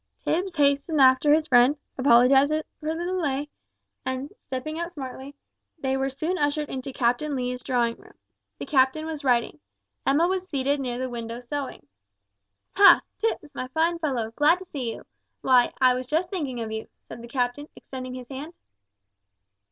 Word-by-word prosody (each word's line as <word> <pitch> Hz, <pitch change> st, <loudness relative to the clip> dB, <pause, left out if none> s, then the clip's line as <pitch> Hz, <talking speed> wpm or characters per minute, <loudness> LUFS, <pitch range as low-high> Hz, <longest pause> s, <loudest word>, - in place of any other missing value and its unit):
Tipps 360 Hz, +2 st, 0 dB
hastened 285 Hz, +2 st, +2 dB
after 260 Hz, +2 st, +5 dB
his 310 Hz, +1 st, +4 dB
friend, 255 Hz, +1 st, +5 dB, 0.2 s
apologised 265 Hz, +2 st, +5 dB, 0.3 s
for 310 Hz, +1 st, -3 dB
the 340 Hz, -, -4 dB
delay, 295 Hz, -6 st, -1 dB, 0.5 s
and, 260 Hz, +2 st, -4 dB
stepping 290 Hz, +5 st, -5 dB
out 340 Hz, +1 st, -4 dB
smartly, 270 Hz, -2 st, -8 dB, 0.4 s
they 265 Hz, -3 st, -1 dB
were 270 Hz, 0 st, 0 dB
soon 320 Hz, +7 st, -3 dB
ushered 290 Hz, 0 st, 0 dB
into 265 Hz, +1 st, -5 dB
Captain 260 Hz, +4 st, 0 dB
Lee's 250 Hz, -1 st, -3 dB
drawing 240 Hz, -2 st, 0 dB
room. -, -, -19 dB, 0.4 s
The -, -, -6 dB
captain 275 Hz, +1 st, +2 dB
was 315 Hz, -2 st, -5 dB
writing. 245 Hz, +2 st, +1 dB, 0.4 s
Emma 300 Hz, +5 st, +3 dB
was 370 Hz, 0 st, -2 dB
seated 280 Hz, 0 st, 0 dB
near 250 Hz, -3 st, -3 dB
the 260 Hz, +1 st, -2 dB
window 235 Hz, -1 st, -6 dB
sewing. 265 Hz, -, -6 dB, 0.9 s
"Ha! 390 Hz, -3 st, +8 dB, 0.2 s
Tipps, 430 Hz, -9 st, -2 dB
my 255 Hz, -, -4 dB
fine 325 Hz, +5 st, 0 dB
fellow, 255 Hz, -8 st, -2 dB
glad 295 Hz, +8 st, +4 dB
to 375 Hz, -, -11 dB
see 260 Hz, -9 st, -4 dB
you; -, -, -10 dB, 0.4 s
why, 250 Hz, -2 st, +4 dB
I 255 Hz, -1 st, +5 dB
was 255 Hz, 0 st, -4 dB
just 330 Hz, +5 st, 0 dB
thinking 285 Hz, -10 st, -3 dB
of 220 Hz, -1 st, -4 dB
you," 220 Hz, 0 st, -5 dB, 0.2 s
said -, -, -9 dB
the 235 Hz, -, -9 dB
captain, 250 Hz, +3 st, -2 dB
extending 255 Hz, -1 st, -8 dB
his 250 Hz, -1 st, -8 dB
hand. 290 Hz, +5 st, -7 dB
275 Hz, 165 wpm, -25 LUFS, 255-310 Hz, 0.9 s, Ha